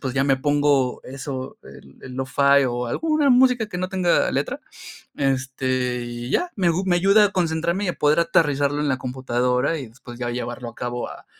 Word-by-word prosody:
pues 130 Hz, -2 st, -3 dB
ya 135 Hz, 0 st, +2 dB
me 135 Hz, -1 st, +3 dB
pongo 145 Hz, -2 st, +1 dB
eso, 130 Hz, 0 st, -6 dB
el 70 Hz, 0 st, -15 dB
el 130 Hz, -, -9 dB
Lo-fi 140 Hz, +2 st, +3 dB
o 120 Hz, 0 st, -3 dB
alguna 305 Hz, -, +1 dB
música 250 Hz, -3 st, +4 dB
que 180 Hz, -, -5 dB
no 185 Hz, 0 st, -2 dB
tenga 185 Hz, -2 st, +2 dB
letra. -, -, -2 dB, 0.6 s
Este, 130 Hz, -2 st, -1 dB
y 120 Hz, +1 st, -6 dB
ya, 355 Hz, -, 0 dB
me 185 Hz, -4 st, +1 dB
agu 170 Hz, +3 st, +1 dB
me 175 Hz, -2 st, +2 dB
ayuda 200 Hz, +4 st, +5 dB
a 205 Hz, -, -1 dB
concentrarme 170 Hz, +2 st, -1 dB
y -, -, -2 dB
a -, -, -1 dB
poder 150 Hz, +2 st, +3 dB
aterrizarlo 145 Hz, -3 st, +1 dB
en 150 Hz, -, 0 dB
la 130 Hz, -, +1 dB
computadora 125 Hz, +3 st, -1 dB
y 130 Hz, -, -7 dB
después 120 Hz, +1 st, -13 dB
ya 120 Hz, -1 st, -2 dB
llevarlo 120 Hz, 0 st, -5 dB
a 115 Hz, -, -16 dB
cabo 120 Hz, 0 st, -4 dB
a -, -, -11 dB
140 Hz, 200 wpm, -22 LUFS, 125-170 Hz, 0.6 s, ayuda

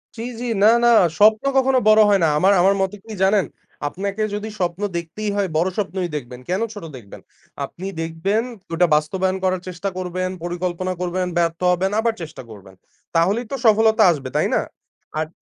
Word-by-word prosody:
জি, 225 Hz, -, -7 dB, 0.2 s
জি 245 Hz, -, -4 dB, 0.2 s
না, -, -, +8 dB, 0.2 s
না -, -, +6 dB, 0.3 s
স্বপ্ন 215 Hz, +3 st, +5 dB
কখনো 265 Hz, 0 st, +3 dB
বড় 215 Hz, 0 st, +7 dB
হয় 200 Hz, -1 st, +4 dB
না। -, -, +5 dB
আমার 190 Hz, +6 st, +4 dB
আমার 195 Hz, +2 st, +4 dB
মতে 190 Hz, +1 st, -1 dB
কি 225 Hz, -, -10 dB
জানেন, 195 Hz, 0 st, +3 dB, 0.4 s
আপনাকে 200 Hz, +6 st, -4 dB
যদি 210 Hz, +1 st, -4 dB
স্বপ্ন 175 Hz, +1 st, -2 dB, 0.2 s
দেখতেই 170 Hz, +6 st, -4 dB
হয়, 200 Hz, -1 st, 0 dB
বড় 170 Hz, +4 st, +2 dB
স্বপ্নই 190 Hz, -3 st, -2 dB
দেখবেন 125 Hz, -3 st, -6 dB
কেনো 190 Hz, +5 st, 0 dB
ছোট 205 Hz, -, -9 dB
দেখবেন? 100 Hz, -5 st, -13 dB, 0.4 s
আপনি 185 Hz, +3 st, -8 dB
দেখবেন 165 Hz, +7 st, -1 dB, 0.3 s
ওটা 175 Hz, +1 st, +3 dB
বাস্তবায়ন 185 Hz, +5 st, 0 dB
করার 185 Hz, -1 st, 0 dB
চেষ্টা 185 Hz, +2 st, -4 dB
করবেন, 185 Hz, 0 st, -3 dB
পরিকল্পনা 180 Hz, +1 st, -3 dB
করবেন, 180 Hz, +1 st, -1 dB
ব্যর্থ 170 Hz, -1 st, 0 dB
হবেন 185 Hz, +2 st, 0 dB
আবার 230 Hz, 0 st, +1 dB
চেষ্টা 160 Hz, -4 st, -8 dB
করবেন 95 Hz, -2 st, -13 dB, 0.4 s
তাহলেই 195 Hz, +9 st, +2 dB
তো -, -, -1 dB
সফলতা 220 Hz, 0 st, +5 dB
আসবে 140 Hz, -5 st, -4 dB
তাই -, -, +2 dB
না? -, -, +2 dB, 0.6 s
আর 155 Hz, -, -1 dB
185 Hz, 180 wpm, -21 LUFS, 170-205 Hz, 0.6 s, না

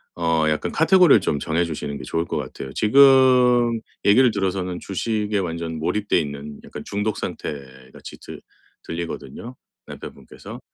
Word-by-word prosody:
어 80 Hz, -2 st, +1 dB
약간 75 Hz, -, -2 dB
카테고리를 165 Hz, -, +5 dB
좀 75 Hz, -, -1 dB
정해주시는 80 Hz, -2 st, -2 dB
게 -, -, -9 dB
좋을 80 Hz, +1 st, -2 dB
것 -, -, -5 dB
같아요. 65 Hz, -, -7 dB
지금 125 Hz, -1 st, +5 dB, 0.3 s
얘기를 120 Hz, +5 st, +5 dB
들어서는 95 Hz, -3 st, -2 dB
주식에 105 Hz, +1 st, -2 dB
완전 85 Hz, -3 st, -4 dB
몰입돼 90 Hz, +5 st, 0 dB
있는 70 Hz, -1 st, -6 dB
약간 -, -, -9 dB
중독 105 Hz, +1 st, -2 dB
상태같이 65 Hz, -2 st, -8 dB
들 -, -, -11 dB, 0.4 s
들리거든요, 85 Hz, +8 st, -7 dB, 0.3 s
남편분께서. -, -, -11 dB
90 Hz, 330 characters per minute, -22 LUFS, 80-115 Hz, 0.4 s, 카테고리를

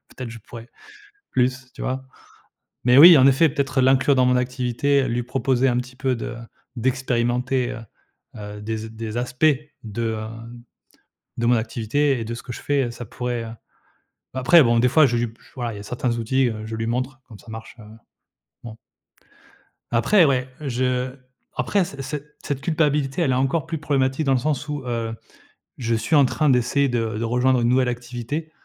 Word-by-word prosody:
peut-être 125 Hz, -3 st, -8 dB
je 115 Hz, -, -9 dB
pourrais 115 Hz, +2 st, -12 dB, 0.6 s
plus». 130 Hz, 0 st, 0 dB
Tu -, -, -10 dB
vois? 130 Hz, +1 st, -3 dB, 0.8 s
Mais 125 Hz, +1 st, +5 dB
oui 165 Hz, +2 st, +11 dB
en 130 Hz, -, +6 dB
effet 140 Hz, +4 st, +4 dB
peut-être 140 Hz, -2 st, 0 dB
l'inclure 130 Hz, +2 st, +4 dB
dans 130 Hz, -1 st, +4 dB
mon 125 Hz, 0 st, +3 dB
activité, 130 Hz, +3 st, 0 dB
heu, -, -, -2 dB
lui 120 Hz, +1 st, -1 dB
proposer 130 Hz, +1 st, +1 dB
un 120 Hz, -, +1 dB
petit 125 Hz, +1 st, -5 dB
peu 130 Hz, -1 st, 0 dB
de 115 Hz, 0 st, -5 dB, 0.4 s
d'expérimenter, 125 Hz, 0 st, 0 dB
heu 120 Hz, -, -6 dB, 0.6 s
heu, 105 Hz, 0 st, -8 dB
des 110 Hz, +1 st, -3 dB
z 110 Hz, +1 st, -7 dB
des 110 Hz, 0 st, -6 dB
aspects 125 Hz, +4 st, -1 dB, 0.4 s
de, 115 Hz, +1 st, -3 dB
hem, 115 Hz, +2 st, -8 dB, 0.7 s
de 115 Hz, -, -1 dB
mon 120 Hz, -, +5 dB
activité 120 Hz, +5 st, 0 dB
et 115 Hz, -, -4 dB
de 115 Hz, +1 st, -4 dB
ce -, -, -9 dB
que 125 Hz, -, -7 dB
je -, -, -9 dB
fais, 140 Hz, -3 st, +1 dB
heu, 120 Hz, -, -4 dB
ça 120 Hz, 0 st, -8 dB
pourrait 120 Hz, +1 st, -4 dB
heu, 115 Hz, -, -7 dB, 0.9 s
après 140 Hz, +6 st, +6 dB
bon, 120 Hz, -1 st, +3 dB
des 125 Hz, -, +4 dB
fois 155 Hz, +4 st, +5 dB
je 120 Hz, -, 0 dB
lui 120 Hz, -, 0 dB
p 115 Hz, -, -18 dB
voilà, 120 Hz, -4 st, -4 dB
il -, -, -8 dB
y 100 Hz, -, -8 dB
a -, -, -7 dB
certains 120 Hz, +2 st, -2 dB
outils, 130 Hz, +3 st, +1 dB
heu, 110 Hz, -1 st, -5 dB
je 110 Hz, -, -6 dB
lui 115 Hz, 0 st, -3 dB
montre 130 Hz, +3 st, -3 dB
comme 110 Hz, -4 st, -12 dB
ça 115 Hz, -, -19 dB
marche, 110 Hz, +1 st, -9 dB
heu, 110 Hz, -, -12 dB, 0.8 s
bon. 115 Hz, -2 st, -8 dB, 1.2 s
Après, 140 Hz, -, +4 dB
ouais, 130 Hz, -2 st, +1 dB
je 125 Hz, -2 st, -1 dB, 0.4 s
après 200 Hz, -2 st, +1 dB
c 140 Hz, -5 st, -9 dB
ce 140 Hz, +3 st, -4 dB, 0.3 s
cette 140 Hz, -2 st, -3 dB
culpabilité, 150 Hz, -1 st, 0 dB
elle 140 Hz, -, +2 dB
est -, -, +2 dB
encore 135 Hz, +5 st, 0 dB
plus 165 Hz, -1 st, -4 dB
problématique 140 Hz, -1 st, 0 dB
de 135 Hz, -, +3 dB
le 130 Hz, -, +4 dB
sens 150 Hz, +2 st, -2 dB
où, 145 Hz, -2 st, -4 dB
heu, 115 Hz, -2 st, -2 dB, 0.6 s
je 115 Hz, -2 st, -1 dB
suis 115 Hz, +8 st, 0 dB
en 145 Hz, -2 st, +6 dB
train 150 Hz, +3 st, +1 dB
d'essayer 130 Hz, +3 st, +2 dB
de 115 Hz, -3 st, -1 dB
de 115 Hz, -, -3 dB
rejoindre 125 Hz, +2 st, +2 dB
une 120 Hz, -, +2 dB
nouvelle 125 Hz, 0 st, +3 dB
activité, 125 Hz, +6 st, -5 dB
125 Hz, 200 wpm, -22 LUFS, 115-135 Hz, 1.2 s, oui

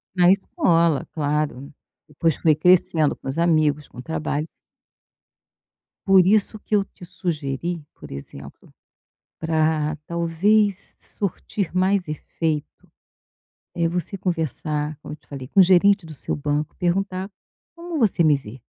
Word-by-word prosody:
Na 175 Hz, 0 st, +5 dB
escola, 170 Hz, -, +2 dB
claro, 150 Hz, -2 st, -2 dB, 0.4 s
depois 155 Hz, +2 st, 0 dB
foi 155 Hz, -2 st, +3 dB
crescendo 160 Hz, -2 st, +3 dB
com -, -, -12 dB
os 135 Hz, +4 st, -3 dB
amigos, 155 Hz, -4 st, +2 dB
com -, -, -18 dB
o -, -, -4 dB
trabalho. 155 Hz, 0 st, -3 dB, 1.6 s
Por 190 Hz, -2 st, +6 dB
isso 215 Hz, +1 st, +2 dB
que 210 Hz, -, -1 dB
eu 200 Hz, -, +3 dB
te 180 Hz, -, -14 dB
sugeri, 165 Hz, -2 st, -3 dB
por -, -, -12 dB
exemplo, 70 Hz, 0 st, -10 dB, 0.7 s
pra 155 Hz, -1 st, +1 dB
talvez 185 Hz, +5 st, +1 dB
surtir 200 Hz, -1 st, -4 dB
mais 185 Hz, -1 st, +2 dB
efeito, 155 Hz, 0 st, -4 dB, 0.9 s
eh, 170 Hz, -1 st, +1 dB
você 180 Hz, +3 st, -3 dB
conversar, 155 Hz, -4 st, -2 dB
como -, -, -8 dB
eu -, -, -9 dB
te -, -, -34 dB
falei, 135 Hz, -3 st, -7 dB
com 195 Hz, -, +1 dB
o -, -, +10 dB
gerente 190 Hz, +1 st, +4 dB
do 155 Hz, -2 st, -10 dB
seu -, -, -3 dB
banco, 145 Hz, +1 st, -2 dB
perguntar: 185 Hz, +2 st, -1 dB, 0.5 s
"Como 335 Hz, -2 st, -5 dB
você 195 Hz, -7 st, +3 dB
me 150 Hz, -2 st, +5 dB
vê?". 125 Hz, -2 st, -9 dB
165 Hz, 140 wpm, -23 LUFS, 150-185 Hz, 1.6 s, o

